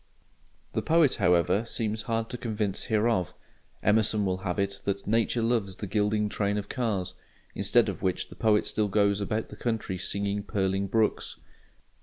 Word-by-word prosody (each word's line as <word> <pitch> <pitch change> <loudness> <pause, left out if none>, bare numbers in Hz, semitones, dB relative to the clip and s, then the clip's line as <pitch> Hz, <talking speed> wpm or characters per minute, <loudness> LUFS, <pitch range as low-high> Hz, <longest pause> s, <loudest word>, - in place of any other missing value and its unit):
The - - 0
poet, 160 -4 +3
however, 90 +2 +3
seems 110 -2 -2
hard 115 0 -2
to 125 - -4
convince 105 -4 -2
hereof. 110 -5 +1 0.5
Emerson 105 0 +3
will 95 -1 0
have 95 0 -3
it 100 0 -1
that 100 0 -2
"Nature 115 +2 +1
loves 115 -5 0
the 105 - -6
gliding 105 +1 +1
train 100 0 -1
of 105 0 -4
cars"; 100 -7 -2 0.4
"instead - - +3
of - - -4
which" 95 -1 -1
the - - -11
poet 110 -2 +2
still 105 -1 0
goes 100 0 +2
about 110 +2 -2
the - - -9
country 110 -6 -2
singing 100 +1 -2
purling 95 0 -1
brooks. 110 +2 0
105 Hz, 165 wpm, -28 LUFS, 100-110 Hz, 0.5 s, poet